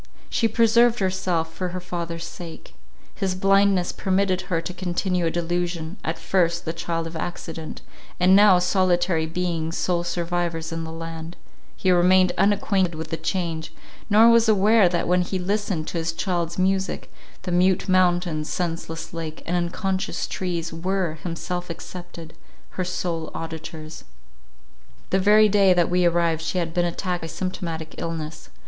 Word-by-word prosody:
She 230 - +2
preserved 230 +1 +4
herself 185 -4 -1
for 185 - -3
her 180 +1 -4
father's 170 -2 -5
sake. 170 -3 -9 0.4
His 190 -2 -2
blindness 195 -1 +3
permitted 190 -1 0
her 170 -3 +1
to 180 +2 -5
continue 180 -1 -1
a - - +2
delusion, 175 +1 -2
at 160 +1 -2
first 170 -2 +1
the 160 - -2
child 165 0 -3
of 165 0 -7
accident—and 165 +2 -2
now 200 -2 +7
solitary 180 -2 +2
beings, 165 -1 -2
sole 175 -2 0
survivors 170 -1 -2
in 165 0 -3
the 160 - -7
land, 165 +1 -7 0.4
he 185 - +1
remained 185 +1 +5
unacquainted 195 -2 +2
with 160 +1 -6
the - - 0
change, 165 -4 -3 0.4
nor 220 +2 +7
was 230 -1 +5
aware 210 -1 +5
that 175 -1 -1
when 180 +1 +3
he 185 +2 -2
listened 190 -3 -1
to 170 - -2
his 165 0 -2
child's 170 -1 -2
music, 190 +1 -1 0.3
the 180 - -3
mute 180 +2 +2
mountains, 175 -4 +2
senseless 165 -2 -4
lake, 165 -1 -6
and 175 - -1
unconscious 185 +2 -1
trees, 170 -3 -3
were, 175 -1 -2
himself 175 +1 -4
excepted, 170 -1 -8 0.4
her 185 - -2
sole 175 -2 -3
auditors. 160 -1 -7 1.1
The 190 - +3
very 210 +2 +6
day 195 -2 +4
that 175 -1 +2
we 180 0 +3
arrived 170 -2 +2
she 165 +3 -2
had 165 -2 -1
been 175 0 +2
attacked 175 +1 -2
by 165 - -5
symptomatic 165 -2 -4
illness. 160 -2 -5
175 Hz, 155 wpm, -24 LUFS, 165-185 Hz, 1.1 s, now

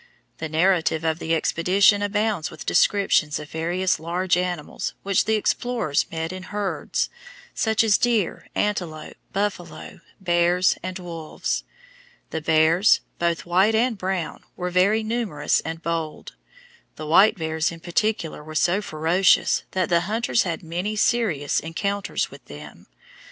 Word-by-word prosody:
The 160 - -4
narrative 165 -1 +2
of 160 0 0
the 165 0 0
expedition 190 +6 +3
abounds 205 -4 0
with 155 - -10
descriptions 195 -7 +2
of 150 0 -9
various 175 +2 0
large 175 +3 0
animals 180 -3 -3
which 195 -1 +2
the 220 - +2
explorers 215 -7 0
met 165 +1 -3
in 185 - -7
herds, 205 0 -2 0.4
such 220 0 +1
as 215 -2 +3
deer, 230 -7 0
antelope, 175 -7 -2 0.2
buffalo, 195 -4 -4 0.2
bears, 175 0 +2
and 185 0 -5
wolves. 170 -4 -4 0.7
The 160 - -3
bears, 160 +5 +4 0.2
both 170 -1 0
white 190 +6 +3
and 235 +1 +2
brown, 185 -4 -3
were 180 0 -3
very 200 +5 +3
numerous 215 -10 0
and 165 +1 -6
bold. 165 -2 -4 0.6
The 155 - -7
white 190 +8 +5
bears 160 0 -1
in 165 - -9
particular 175 -2 -1
were 155 +1 -10
so 175 +5 +2
ferocious 170 +2 +2
that 185 -2 0
the 170 -1 +3
hunters 225 +5 0
had 170 -1 -3
many 175 +6 -3
serious 205 - +1
encounters 200 +6 -2
with - - -14
them. 75 0 -12
180 Hz, 140 wpm, -23 LUFS, 160-205 Hz, 0.7 s, white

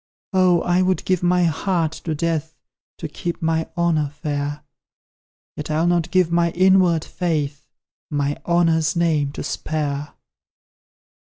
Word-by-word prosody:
Oh, 185 -2 +4
I 180 +1 +2
would 185 0 0
give 185 -2 +1
my 180 0 +3
heart 165 0 0
to 160 -2 -1
death, 160 0 -2 0.4
To - - -5
keep 170 -1 -5
my 160 0 0
honour 160 -4 +1
fair; 145 0 -4 0.9
Yet, 150 - -6
I'll 155 +2 +1
not 175 -1 +1
give 180 -2 +2
my 170 0 +3
inward 185 -3 +4
faith 150 -5 -3 0.4
My 145 -1 -1
honour's 165 -2 +2
NAME 155 -4 +1
to - - -5
spare! 150 -2 -3
165 Hz, 135 wpm, -21 LUFS, 150-175 Hz, 0.9 s, Oh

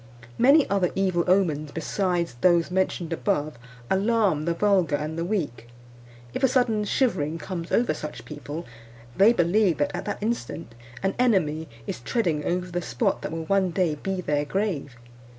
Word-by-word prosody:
Many 275 +4 +6
other 195 -3 +1
evil 185 -3 +1
omens 160 -6 +2
besides 170 -1 -1
those 175 -1 +4
mentioned 180 -2 0
above 155 - -1 0.3
alarm 195 - +2
the 170 0 0
vulgar 185 -5 +2
and 150 +2 -3
the 165 - -2
weak. 170 - -3 0.7
If - - -3
a 265 - +5
sudden 235 -5 +1
shivering 165 - 0
comes 170 -1 -6
over 240 - +2
such 150 0 -7
people, 150 +2 -7 0.5
they 200 +4 +6
believe 180 -3 +2
that, 145 - 0
at - - -5
that - - -3
instant, 215 - -3 0.3
an 195 0 +1
enemy 165 -10 +2 0.2
is - - -4
treading 155 - -1
over 180 +1 -1
the 175 +1 -2
spot 120 -7 -1
that - - -4
will 165 0 -4
one 195 +1 +2
day 175 -2 +1
be 185 +5 -3
their 145 -3 0
grave. 160 - -2
175 Hz, 165 wpm, -25 LUFS, 155-200 Hz, 0.7 s, Many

